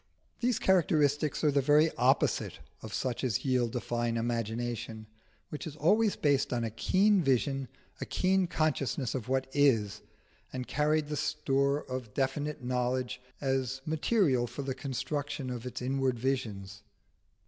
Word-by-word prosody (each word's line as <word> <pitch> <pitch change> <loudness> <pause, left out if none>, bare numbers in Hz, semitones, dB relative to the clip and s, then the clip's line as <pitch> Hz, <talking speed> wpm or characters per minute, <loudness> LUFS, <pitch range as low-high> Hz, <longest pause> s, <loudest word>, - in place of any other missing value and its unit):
These 245 -1 +1
characteristics 150 -5 +2
are 150 - +4
the 140 0 +3
very 150 +3 +4
opposite 125 +3 +2 0.2
of 110 - -8
such 125 +3 -2
as 125 -2 0
yield 125 -2 +1
a - - +1
fine 120 -1 -1
imagination, 115 -1 -3 0.4
which 150 - -6
is 150 - -7
always 205 +8 +3
based 145 -2 +1
on 120 -2 0
a 115 - -2
keen 195 - +3
vision, 135 -1 +1 0.3
a - - -2
keen 190 0 +2
consciousness 140 -6 -1
of 125 -1 -4
what 130 0 +1
is, 115 -8 +2 0.5
and 125 -1 -5
carries 150 +2 +1
the 150 0 -4
store 140 -1 0
of 125 -5 -6
definite 145 +1 -1
knowledge 125 0 -1 0.2
as 135 -1 -1
material 155 - +2
for 140 - -6
the 135 -1 -2
construction 140 +1 -3
of 125 0 -5
its 125 - -6
inward 130 -1 0
visions. 105 -6 -3
135 Hz, 150 wpm, -30 LUFS, 120-150 Hz, 0.5 s, are